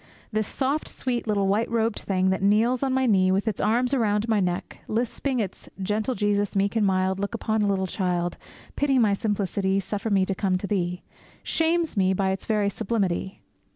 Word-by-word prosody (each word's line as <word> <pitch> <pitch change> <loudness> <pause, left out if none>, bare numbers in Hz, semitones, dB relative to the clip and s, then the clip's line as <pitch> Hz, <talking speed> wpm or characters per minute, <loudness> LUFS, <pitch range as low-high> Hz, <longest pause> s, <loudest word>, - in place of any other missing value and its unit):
This 215 -1 0
soft, 280 +3 -1
sweet 245 -3 -2
little 200 -2 +1
white 210 +4 +1
robed 230 -1 0
thing 190 -1 +1
that 190 - -1
kneels 220 +5 +3
on 270 -1 +1
my 260 0 +2
knee, 190 -5 +4
with 195 +4 0
its 215 - -1
arms 245 +4 +2
around 215 -4 +1
my 220 -2 +2
neck, 180 -2 -2
lisping 245 +3 -1
its 195 -4 -5
Gentle 210 +6 -1
Jesus, 205 -1 0
meek 200 +2 +1
and 220 - +2
mild, 190 0 +1
Look 200 +4 -2
upon 220 -1 0
a 205 - +2
little 195 -1 +1
child! 175 -2 -1 0.4
Pity 280 -2 +2
my 215 -5 +4
simplicity! 200 -2 0
Suffer 200 +3 -3
me 195 -2 +3
to 195 - -1
come 190 -1 0
to 185 - -5
Thee! 180 -3 -2 0.4
shames 325 -1 +1
me 190 -2 +3
by 190 0 +1
its 190 - -5
very 210 -2 +1
sublimity. 195 -3 -2
205 Hz, 195 wpm, -25 LUFS, 190-230 Hz, 0.4 s, knee